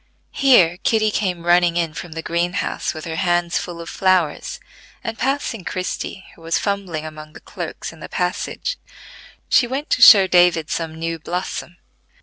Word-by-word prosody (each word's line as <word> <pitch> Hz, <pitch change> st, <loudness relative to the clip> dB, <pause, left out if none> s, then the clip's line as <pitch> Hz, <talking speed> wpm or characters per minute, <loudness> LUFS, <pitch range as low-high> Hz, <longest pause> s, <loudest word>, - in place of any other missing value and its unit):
Here 190 Hz, -11 st, +4 dB
Kitty 215 Hz, -1 st, +2 dB
came 180 Hz, -5 st, -2 dB
running 175 Hz, 0 st, +4 dB
in 165 Hz, -2 st, -1 dB
from 170 Hz, +1 st, -8 dB
the 165 Hz, 0 st, -6 dB
green 170 Hz, +1 st, -1 dB
house -, -, -2 dB
with 155 Hz, -, -7 dB
her 160 Hz, -1 st, -5 dB
hands 175 Hz, -1 st, +1 dB
full 175 Hz, -1 st, -7 dB
of 165 Hz, -, -8 dB
flowers, 185 Hz, -4 st, 0 dB, 0.4 s
and 225 Hz, -, -4 dB
passing 265 Hz, -6 st, -1 dB
Christie, 185 Hz, +1 st, -4 dB
who -, -, -20 dB
was 165 Hz, 0 st, 0 dB
fumbling 190 Hz, -6 st, -3 dB
among 155 Hz, 0 st, -10 dB
the -, -, -11 dB
cloaks -, -, -7 dB
in -, -, -16 dB
the -, -, -9 dB
passage, -, -, -3 dB, 0.7 s
she 245 Hz, -, +4 dB
went 270 Hz, +4 st, -4 dB
to -, -, +2 dB
show 200 Hz, -4 st, +10 dB
David 175 Hz, -4 st, +3 dB
some 165 Hz, -1 st, -3 dB
new 165 Hz, 0 st, -4 dB
blossom. 175 Hz, +1 st, -5 dB
175 Hz, 170 wpm, -20 LUFS, 165-195 Hz, 0.7 s, show